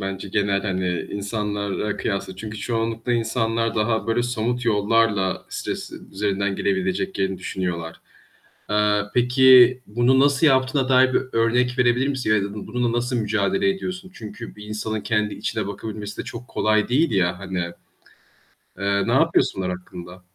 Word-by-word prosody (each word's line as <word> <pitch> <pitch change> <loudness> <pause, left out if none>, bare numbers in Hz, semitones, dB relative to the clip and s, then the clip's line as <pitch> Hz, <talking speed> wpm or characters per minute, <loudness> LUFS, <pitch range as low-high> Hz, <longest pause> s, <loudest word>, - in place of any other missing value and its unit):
bence, 95 0 -5
genel 100 -1 0
hani 90 -3 -2
insanlarla 105 0 -3
kıyasla 95 -1 -3
çünkü 110 +2 -7
çoğunlukla 115 +1 -2
insanlar 115 -1 0
daha 110 +1 0
böyle 115 +1 +1
somut 120 0 -2
yollarla 105 -3 +1
stres - - -5 0.2
üzerinden 100 0 -1
gelebileceklerini 185 - -1
düşünüyorlar. 90 -3 -4 0.7
Eee, 105 0 +2
peki, 125 0 +6
bunu 120 +5 +3
nasıl 140 +2 +4
yaptığına 130 -1 +2
dair 130 0 +5
bir - - +4
örnek 125 +2 +1
verebilir 125 +2 +3
misin? 130 -5 -2
Ya 100 - +2
da 100 - -6
bununla 115 +3 -2
nasıl 125 +1 -2
mücadele 105 - +1
ediyorsun? 185 -1 -5
Çünkü 110 +1 -9
bir 105 - -10
insanın 105 +1 -3
kendi 105 -1 0
içine - - -3
bakabilmesi 105 +1 -6
de - - -14
çok 125 +1 -8
kolay 110 -3 +1
değil 145 +7 +2
ya 90 -3 +1
hani. 95 -1 -5 1.2
Eee, 100 0 0
napıyorsun - - +2
onlar 90 -1 -2
hakkında? 90 0 -11
110 Hz, 140 wpm, -23 LUFS, 100-125 Hz, 1.2 s, peki